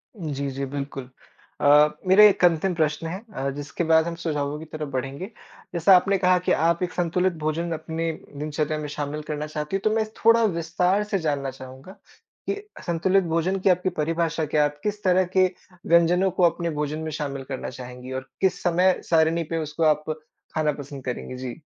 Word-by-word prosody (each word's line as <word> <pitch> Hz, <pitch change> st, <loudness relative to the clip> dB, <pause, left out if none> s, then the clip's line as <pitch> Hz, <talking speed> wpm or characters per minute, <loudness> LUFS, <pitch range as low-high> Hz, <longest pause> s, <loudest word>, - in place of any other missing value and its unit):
जी, 145 Hz, -7 st, -3 dB
जी, 135 Hz, +1 st, -3 dB
बिल्कुल। 135 Hz, -1 st, -6 dB, 0.5 s
अ, 150 Hz, +1 st, +6 dB, 0.2 s
मेरा 190 Hz, +3 st, +7 dB
1 200 Hz, -3 st, +6 dB
अंतिम 175 Hz, +2 st, +2 dB
प्रश्न 155 Hz, 0 st, 0 dB
है 185 Hz, +4 st, -5 dB
अ, 135 Hz, -2 st, -2 dB
जिसके 145 Hz, +4 st, -4 dB
बाद 160 Hz, 0 st, +4 dB
हम 170 Hz, -, -3 dB
सुझावों 150 Hz, -3 st, -2 dB
की 160 Hz, -, -8 dB
तरफ 155 Hz, -1 st, -6 dB
बढ़ेंगे। 135 Hz, +6 st, -3 dB, 0.5 s
जैसा 175 Hz, +3 st, +6 dB
आपने 195 Hz, +2 st, +3 dB
कहा 180 Hz, -1 st, +4 dB
कि -, -, +4 dB
आप 170 Hz, +2 st, +2 dB
एक 180 Hz, -, -3 dB
संतुलित 180 Hz, +1 st, +1 dB
भोजन 165 Hz, +2 st, -1 dB
अपने 160 Hz, +1 st, -3 dB, 0.3 s
दिनचर्या 150 Hz, +1 st, -2 dB
में 150 Hz, -, -4 dB
शामिल 145 Hz, +1 st, -4 dB
करना 150 Hz, 0 st, -3 dB
चाहती 150 Hz, +3 st, -4 dB
हो, -, -, +1 dB
तो -, -, +3 dB
मैं 220 Hz, -1 st, +1 dB, 0.2 s
थोड़ा 230 Hz, 0 st, +6 dB
विस्तार 180 Hz, +1 st, +1 dB
से 210 Hz, -2 st, -1 dB
जानना 145 Hz, -4 st, -1 dB
चाहूँगा 130 Hz, +5 st, -11 dB, 0.6 s
कि -, -, 0 dB, 0.3 s
संतुलित 185 Hz, +3 st, +2 dB
भोजन 180 Hz, +4 st, +1 dB
की 190 Hz, -, +2 dB
आपकी 180 Hz, +1 st, +2 dB
परिभाषा 165 Hz, 0 st, 0 dB
क्या 150 Hz, 0 st, +2 dB
है? 145 Hz, -, +2 dB
आप 145 Hz, 0 st, -17 dB
किस 210 Hz, 0 st, -3 dB
तरह 185 Hz, -1 st, +4 dB
के 185 Hz, -, +7 dB, 0.4 s
व्यंजनों 175 Hz, +3 st, +4 dB
को 185 Hz, 0 st, 0 dB
अपने 170 Hz, 0 st, -4 dB
भोजन 150 Hz, +1 st, -2 dB
में 160 Hz, 0 st, -4 dB
शामिल 140 Hz, -3 st, -4 dB
करना 130 Hz, -1 st, -5 dB
चाहेंगी 125 Hz, 0 st, -9 dB
और 130 Hz, 0 st, -17 dB
किस 190 Hz, -1 st, +1 dB
समय 180 Hz, +1 st, +3 dB
सारणी 165 Hz, 0 st, +3 dB
पे -, -, +1 dB
उसको 155 Hz, +2 st, -3 dB
आप 150 Hz, -1 st, +3 dB, 0.5 s
खाना 155 Hz, -1 st, +2 dB
पसंद 140 Hz, -1 st, -9 dB
करेंगी? 125 Hz, 0 st, -4 dB
जी। 125 Hz, +3 st, -7 dB
160 Hz, 195 wpm, -24 LUFS, 145-180 Hz, 0.6 s, मेरा